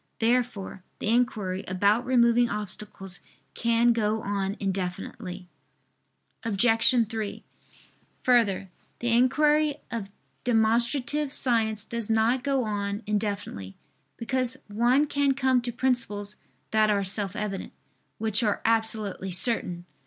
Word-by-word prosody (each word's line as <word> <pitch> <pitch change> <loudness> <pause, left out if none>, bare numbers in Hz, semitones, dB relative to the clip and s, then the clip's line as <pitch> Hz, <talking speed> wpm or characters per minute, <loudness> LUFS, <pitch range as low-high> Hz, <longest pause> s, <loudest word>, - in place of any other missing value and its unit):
Therefore 230 -5 -1
the - - -2
inquiry 220 -6 0
about 205 +6 +2
removing 240 -1 +4
obstacles 200 -2 -6 0.3
can 235 0 +3
go 220 -1 0
on 200 0 -2
indefinitely. 185 0 -4 1.0
Obj. 225 +2 +3
3: 220 -2 -5 0.8
Further, 205 -7 +2 0.3
the 240 - -2
inquiry 295 +4 +3 0.2
of 220 -4 -4 0.3
demonstrative 240 +5 +2
science 225 -6 +1
does 230 -2 -5
not 225 +3 +2
go 275 -2 +1
on 205 0 -3
indefinitely, 200 - -3 0.4
because 255 +1 -1
one 240 +7 +2
can 285 -2 +1
come 260 -2 +2
to 240 0 -4
principles 215 -5 -1 0.3
that 215 0 +3
are 200 -1 +2
self 195 +1 +1
evident, 210 -3 -4 0.5
which 220 0 +1
are 210 -3 +1
absolutely 220 -4 +1
certain. 180 -3 +1
225 Hz, 110 wpm, -26 LUFS, 200-245 Hz, 1.0 s, removing